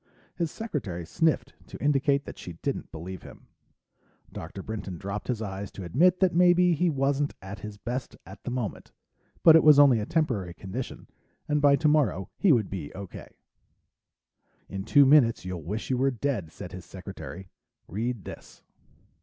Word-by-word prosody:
His 170 Hz, -2 st, -2 dB
secretary 115 Hz, -, -4 dB
sniffed 140 Hz, -, 0 dB
to -, -, -9 dB
indicate 140 Hz, 0 st, +2 dB
that -, -, -9 dB
she 90 Hz, -, -7 dB
didn't -, -, -3 dB
believe 85 Hz, +3 st, -7 dB
him. -, -, -13 dB, 0.9 s
Dr. 90 Hz, +4 st, -7 dB
Brinton 100 Hz, -5 st, -5 dB
dropped 100 Hz, +2 st, -5 dB
his 115 Hz, -3 st, -2 dB
eyes 100 Hz, -1 st, -5 dB
to 95 Hz, -, -7 dB
admit 175 Hz, -, +3 dB
that 185 Hz, -2 st, +4 dB
maybe 180 Hz, 0 st, +5 dB
he 175 Hz, +2 st, +2 dB
wasn't 140 Hz, 0 st, 0 dB
at 95 Hz, +2 st, -8 dB
his 105 Hz, -1 st, -8 dB
best 125 Hz, +5 st, -5 dB
at -, -, -12 dB
the -, -, -4 dB
moment, 120 Hz, -4 st, -4 dB, 0.5 s
but 160 Hz, -, +9 dB
it 160 Hz, -, +6 dB
was 150 Hz, -2 st, +8 dB
only 140 Hz, -5 st, +7 dB
a 105 Hz, -, -4 dB
temporary 115 Hz, -, -1 dB
condition, 105 Hz, +6 st, -6 dB, 0.4 s
and 150 Hz, -1 st, +1 dB
by 140 Hz, -1 st, +6 dB
tomorrow 140 Hz, -, +1 dB
he 195 Hz, -, +5 dB
would 115 Hz, -8 st, +2 dB
be 85 Hz, -7 st, -5 dB
okay. 95 Hz, -2 st, -9 dB, 1.3 s
"In 95 Hz, 0 st, -6 dB
two 140 Hz, +4 st, +6 dB
minutes 130 Hz, -8 st, +5 dB
you'll 90 Hz, -2 st, -4 dB
wish 105 Hz, -, -4 dB
you 125 Hz, -, +1 dB
were 135 Hz, +1 st, +3 dB
dead," 120 Hz, -, -2 dB
said 90 Hz, -, -9 dB
his 90 Hz, 0 st, -8 dB
secretary. 95 Hz, 0 st, -9 dB, 0.4 s
"Read 115 Hz, +3 st, -3 dB
this." -, -, -11 dB
120 Hz, 170 wpm, -27 LUFS, 95-145 Hz, 1.3 s, but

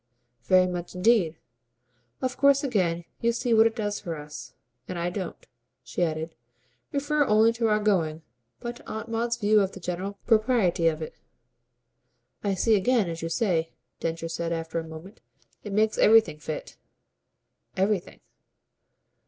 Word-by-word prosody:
"Very 185 Hz, 0 st, +5 dB
much 180 Hz, 0 st, -5 dB
indeed. 180 Hz, -4 st, +3 dB, 0.9 s
Of 255 Hz, -1 st, -1 dB
course 280 Hz, 0 st, +4 dB
again 180 Hz, -10 st, 0 dB
you 235 Hz, -, +2 dB
see 240 Hz, 0 st, 0 dB
what 225 Hz, 0 st, +7 dB
it 225 Hz, -, -4 dB
does 205 Hz, -3 st, -2 dB
for 170 Hz, -2 st, -5 dB
us. 150 Hz, 0 st, -9 dB, 0.3 s
And 180 Hz, -, -5 dB
I 170 Hz, +1 st, -1 dB
don't," 185 Hz, -1 st, -6 dB, 0.4 s
she -, -, -5 dB
added, 160 Hz, -1 st, -1 dB, 0.6 s
"refer 290 Hz, +1 st, +1 dB
only 220 Hz, +1 st, +4 dB
to 230 Hz, -1 st, 0 dB
our 210 Hz, -1 st, +3 dB
going, 170 Hz, -7 st, 0 dB, 0.4 s
but 240 Hz, 0 st, -5 dB
to -, -, -17 dB
Aunt 220 Hz, +1 st, -5 dB
Maud's 235 Hz, +1 st, -1 dB
view 210 Hz, -1 st, +4 dB
of 195 Hz, -1 st, -1 dB
the -, -, -9 dB
general 185 Hz, +3 st, -4 dB
propriety 215 Hz, -7 st, +3 dB
of 160 Hz, -1 st, 0 dB
it." -, -, -7 dB, 1.3 s
"I 200 Hz, -2 st, 0 dB
see 225 Hz, +4 st, +2 dB
again, 205 Hz, -2 st, +2 dB
as 165 Hz, -, -6 dB
you 165 Hz, -, -3 dB
say," 165 Hz, -2 st, 0 dB, 0.3 s
Densher 165 Hz, 0 st, -3 dB
said 170 Hz, 0 st, -3 dB
after 165 Hz, 0 st, -2 dB
a -, -, -4 dB
moment. 160 Hz, +6 st, -11 dB, 0.4 s
"It 210 Hz, -, -6 dB
makes 215 Hz, +2 st, +1 dB
everything 215 Hz, -9 st, +5 dB
fit." 155 Hz, 0 st, -6 dB, 1.0 s
"Everything." 195 Hz, -1 st, -1 dB
195 Hz, 155 wpm, -26 LUFS, 165-225 Hz, 1.3 s, what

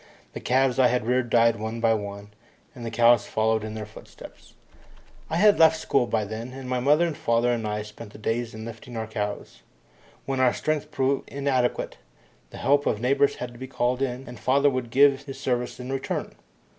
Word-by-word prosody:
The -, -, -5 dB
calves 130 Hz, +1 st, +1 dB
I 130 Hz, -, +6 dB
had 125 Hz, -3 st, 0 dB
reared 125 Hz, 0 st, +1 dB
died 115 Hz, 0 st, +4 dB
one 110 Hz, +2 st, -4 dB
by 115 Hz, -1 st, +3 dB
one, 100 Hz, -1 st, -5 dB, 0.4 s
and 125 Hz, -5 st, -10 dB
the 115 Hz, -, -3 dB
cows 120 Hz, 0 st, +4 dB
followed 110 Hz, 0 st, +1 dB
in 110 Hz, 0 st, -6 dB
their 110 Hz, -1 st, -5 dB
footsteps. 105 Hz, -, -14 dB, 0.7 s
I -, -, -2 dB
had 205 Hz, +4 st, +5 dB
left 160 Hz, 0 st, +6 dB
school 135 Hz, -5 st, +1 dB
then, 110 Hz, +3 st, -3 dB
and 135 Hz, -1 st, -8 dB
my 125 Hz, 0 st, -1 dB
mother 150 Hz, +6 st, +4 dB
and 165 Hz, -3 st, -3 dB
father 115 Hz, 0 st, +1 dB
and 115 Hz, -2 st, -1 dB
I 105 Hz, 0 st, -2 dB
spent 105 Hz, 0 st, -11 dB
the -, -, -12 dB
days 115 Hz, +2 st, -2 dB
in 110 Hz, 0 st, -7 dB
lifting 115 Hz, +1 st, -9 dB
our 110 Hz, -, -2 dB
cows. 105 Hz, -, -5 dB, 0.6 s
When 135 Hz, -1 st, -2 dB
our 130 Hz, -2 st, +4 dB
strength 155 Hz, -1 st, -2 dB
proved 135 Hz, -2 st, -1 dB
inadequate, 135 Hz, -3 st, -1 dB, 0.5 s
the -, -, -11 dB
help 145 Hz, +1 st, +2 dB
of 105 Hz, -, 0 dB
neighbours 140 Hz, +4 st, +2 dB
had 125 Hz, -1 st, -6 dB
to 120 Hz, -, -14 dB
be 130 Hz, -, -6 dB
called 125 Hz, 0 st, -1 dB
in, 130 Hz, 0 st, -3 dB
and 120 Hz, -2 st, -9 dB
father 140 Hz, +5 st, +3 dB
would 130 Hz, -2 st, -3 dB
give 140 Hz, +2 st, +4 dB
his 135 Hz, -2 st, -8 dB
services 125 Hz, -1 st, -2 dB
in 125 Hz, +2 st, -5 dB
return. 135 Hz, -, -3 dB
125 Hz, 205 wpm, -25 LUFS, 110-135 Hz, 0.7 s, I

